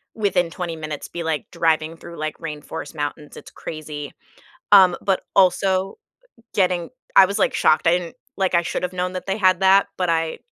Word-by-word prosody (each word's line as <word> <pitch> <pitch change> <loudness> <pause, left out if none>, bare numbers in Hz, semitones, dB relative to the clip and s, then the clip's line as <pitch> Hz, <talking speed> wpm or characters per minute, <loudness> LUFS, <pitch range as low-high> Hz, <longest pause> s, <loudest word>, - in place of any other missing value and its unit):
within 195 -5 +1
20 170 -1 -5
minutes 155 -2 -6
be, 175 - -6
like, 160 -2 -2
driving 160 0 0
through, 170 +1 -11
like, 155 0 -4
rainforest 160 0 -7
mountains, 145 0 -5
it's - - -12
crazy. 150 -2 -7 0.6
Um, 190 -3 +7
but 195 -2 0
also 190 0 +2 0.4
uh, - - -20
getting 180 -3 +1 0.3
I 190 - +9
was, 200 +3 -3
like, - - +2
shocked. 155 +1 +3
I 170 +2 +5
didn't 175 +6 -9 0.2
like, 190 -2 +1
I 170 - +4
should - - -3
have 180 0 -2
known 180 0 -2
that 185 - -6
they 195 0 -1
had 185 -3 +3
that, 195 +1 +5
but 180 -1 0
I, 165 -1 -1
175 Hz, 195 wpm, -22 LUFS, 160-190 Hz, 0.6 s, I